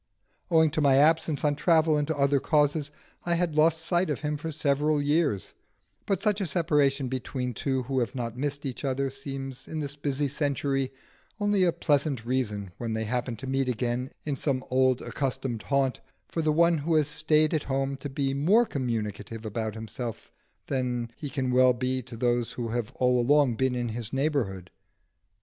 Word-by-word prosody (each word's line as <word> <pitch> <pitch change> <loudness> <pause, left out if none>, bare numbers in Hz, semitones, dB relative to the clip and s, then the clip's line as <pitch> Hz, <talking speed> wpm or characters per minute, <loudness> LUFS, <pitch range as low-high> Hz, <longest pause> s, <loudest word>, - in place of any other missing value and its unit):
Owing 160 -2 +4
to 155 - -1
my 140 -2 +5
absence 155 +1 +3
on 145 -1 +2
travel 160 0 +3
and 145 -1 0
to 160 -2 -2
other 140 0 +3
causes 145 0 +1 0.3
I 175 -1 +1
had 170 -2 0
lost 160 +1 +3
sight 175 0 +1
of 150 - -2
him 150 -1 -1
for 160 +2 -5
several 150 0 +1
years, 145 - 0 0.5
but 195 -2 0
such 210 -2 +2
a 190 - -1
separation 145 -5 +2
between 125 0 -3
two 130 +2 -1
who 130 +1 -1
have 120 +1 -2
not 120 -2 -3
missed 145 +2 -3
each 130 +1 -5
other 135 0 -1
seems 135 -1 -6
in 160 - -4
this 145 -1 -4
busy 145 0 -1
century 140 -2 -1 0.5
only 205 -2 +2
a 175 - +4
pleasant 145 -6 0
reason, 105 -6 -1
when 115 -2 -3
they 110 0 -1
happen 125 +2 -2
to 110 - -8
meet 135 0 0
again 125 +1 -1
in 145 -2 -2
some 135 -1 -1
old 130 -1 +3
accustomed 130 -4 -3
haunt, 135 -2 0 0.3
for 165 - -2
the 155 -1 +2
one 170 +1 +4
who 160 +3 0
has 155 -2 +3
stayed 155 0 +2
at 155 - 0
home 135 0 -1
to 145 - -6
be 135 0 -1
more 190 +13 +4
communicative 115 - -4
about 110 0 -3
himself 115 +1 -6 0.3
than 125 -3 -2
he 145 - -6
can 130 -2 -1
well 130 0 +5
be 130 +1 -1
to 120 -1 -10
those 120 0 0
who 120 -2 -4
have 120 0 -2
all 125 -1 +3
along 140 0 +4
been 130 +2 0
in 120 -1 -2
his 115 0 -5
neighbourhood. 135 - -1
135 Hz, 190 wpm, -27 LUFS, 125-150 Hz, 0.5 s, my